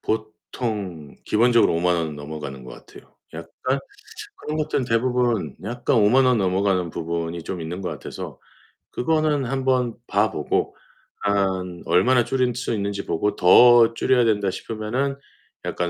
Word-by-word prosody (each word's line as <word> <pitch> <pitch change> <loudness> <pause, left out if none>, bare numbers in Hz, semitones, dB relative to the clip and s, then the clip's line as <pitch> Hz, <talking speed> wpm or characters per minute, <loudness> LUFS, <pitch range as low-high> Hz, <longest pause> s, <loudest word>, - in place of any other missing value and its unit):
보통 110 - -4
기본적으로 120 -2 +3
50,000 90 +1 +2
원은 80 -3 -2
넘어가는 75 -2 -7
것 - - -10 0.2
같아요. - - -16 0.2
약간 85 +11 -3 0.6
그런 155 +1 -5
것들은 150 -4 -1
대부분 120 -1 0
약간 120 +4 -1
50,000 115 +5 +4
원 125 -2 +3
넘어가는 95 -2 0
부분이 85 +1 -4
좀 90 0 -5
있는 85 +4 -5
것 90 - -3
같아서 75 -5 -8 0.5
그거는 155 -1 0
한번 130 -2 0
봐 - - +1
보고 - - -1 0.5
한 95 -3 -1
얼마나 120 +6 +3
줄일 125 -2 0
수 125 -1 -2
있는지 100 -1 -3
보고 105 +6 -1
더 115 +5 +7
줄여야 125 +1 +2
된다 105 -3 +1
싶으면은 115 +8 -3 0.5
약간 90 -1 -2
105 Hz, 285 characters per minute, -23 LUFS, 90-125 Hz, 0.6 s, 더